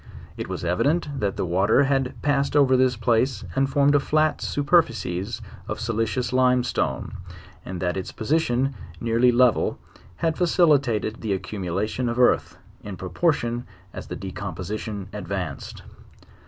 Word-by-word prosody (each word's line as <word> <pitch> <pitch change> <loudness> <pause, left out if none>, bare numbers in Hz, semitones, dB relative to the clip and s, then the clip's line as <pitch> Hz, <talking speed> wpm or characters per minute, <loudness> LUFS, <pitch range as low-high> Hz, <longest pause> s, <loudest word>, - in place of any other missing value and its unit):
It - - -6
was - - -4
evident 140 - 0
that 100 -2 -1
the - - -1
water 95 +9 +3
had 135 -2 0
pas 140 -1 +2
sed - - -8
over 135 -3 +5
this 130 -2 +3
place, 120 0 +1
and 135 0 +2
formed 140 +1 +3
a 145 - +5
flat 155 +2 +1
superfices 120 - 0 0.3
of - - -4
solicious 115 +2 -1
limestone; 125 -1 +1 0.5
and 90 -1 -6
that 90 -1 0
its 95 -1 -4
position, 135 0 0 0.3
nearly 120 +2 +3
level, 125 0 +3 0.4
had 160 - -1
facilitated 140 - +2
the 110 -3 -1
accumulation 95 +5 -2
of 120 - -3
earth, 125 -1 +3 0.3
in 100 -3 -7
proportion 120 - -1 0.3
as - - -7
the - - -5
decomposi 95 +1 -5
tion 100 -4 -6
advanced. 95 -7 -5
120 Hz, 140 wpm, -24 LUFS, 100-135 Hz, 0.5 s, over